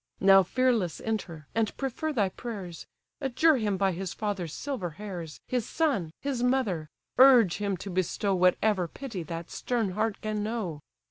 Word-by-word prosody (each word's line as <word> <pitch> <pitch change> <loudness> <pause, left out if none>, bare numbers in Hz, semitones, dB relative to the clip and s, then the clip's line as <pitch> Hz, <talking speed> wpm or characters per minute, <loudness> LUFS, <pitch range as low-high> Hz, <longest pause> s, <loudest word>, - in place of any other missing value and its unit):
Now 195 0 +7
fearless 225 -3 +1
enter, 185 -9 -4
and 225 -2 0
prefer 275 +4 -2
thy 210 -9 +1
prayers; 190 -6 -7 0.3
Adjure 275 +3 +3
him 210 -4 0
by 195 0 +2
his 185 +1 -5
father's 195 -6 -3
silver 255 - -4
hairs, 180 -7 -7
His 250 -2 0
son, 275 - +1
his 275 -4 -2
mother! 235 - +1 0.3
urge 250 -9 +7
him 200 -2 -1
to 195 +3 -7
bestow 185 +2 0
Whatever 185 +1 +3
pity 225 - -6
that 165 +1 -6
stern 230 -6 -1
heart 215 +2 -1
can 215 -1 -2
know." 210 -8 -3
205 Hz, 155 wpm, -28 LUFS, 180-245 Hz, 0.3 s, Now